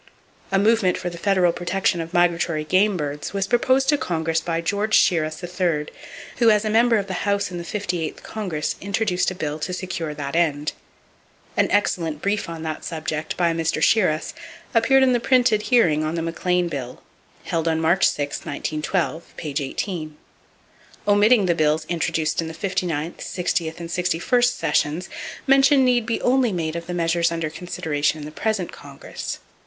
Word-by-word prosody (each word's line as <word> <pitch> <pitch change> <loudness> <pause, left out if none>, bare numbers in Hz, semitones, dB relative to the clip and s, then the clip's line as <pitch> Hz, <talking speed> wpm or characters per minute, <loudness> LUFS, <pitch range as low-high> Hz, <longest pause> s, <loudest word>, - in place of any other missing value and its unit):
A 195 - +3
movement 205 -2 +3
for 175 - -4
the 170 - -8
federal 185 -3 +3
protection 175 0 0
of 165 0 -7
migratory 170 -3 +1
game 185 +5 +2
birds 145 +1 -4
was 195 -1 0
proposed 260 +5 +2
to 295 - +3
Congress 165 -7 -1
by 165 0 -2
George 205 +5 +1
Shiras, 155 -3 +2
3rd, 175 -4 -1 0.5
who 235 -2 +5
as 210 0 +3
a 215 - 0
member 230 +1 +4
of 200 - -1
the 190 -2 -4
House 200 -2 0
in 175 - -5
the - - -5
58th 175 -4 -3
Congress 185 -9 -3
introduced 200 -2 0
a 185 - -6
bill 150 -3 -3
to 175 - -3
secure 170 -4 -4
that 140 +1 -5
end. 150 -3 +1 0.8
An - - +2
excellent 170 -6 0
brief 200 +1 -1
on 165 -1 -6
that 155 -1 -4
subject 155 -1 -4
by 170 -2 +2
Mr. 165 0 -1
Shiras 170 -8 +2 0.4
appeared 260 +3 +4
in 255 -1 +4
the 240 - +2
printed 245 -3 +3
hearing 165 -11 +4
on 155 +2 -2
the 165 - -2
McLean 175 +1 0
bill, 135 -6 -6 0.4
held 165 -1 -2
on 160 -1 +1
March 165 +3 +3
6, 145 -1 -3
1912, 155 +3 -3
page 145 -2 -3
18. 155 +2 -4 0.9
Omitting 205 +1 +5
the 175 - +3
bills 155 -1 +1
introduced 160 -1 -1
in 165 - -4
the 160 - -7
59th, 175 -4 -2
60th 170 -2 -2
and 170 -1 -6
61st 180 +8 +1
sessions, 150 +4 0 0.4
mention 270 0 +5
need 245 -3 +2
be 230 - +1
made - - -10
only 235 -11 +2
of 170 0 -5
the 175 - -3
measures 170 0 +1
under 165 -2 -2
consideration 155 -3 -2
in 150 - -7
the 150 - -8
present 205 +1 -2
Congress. 140 -1 -7
175 Hz, 175 wpm, -22 LUFS, 160-200 Hz, 0.9 s, who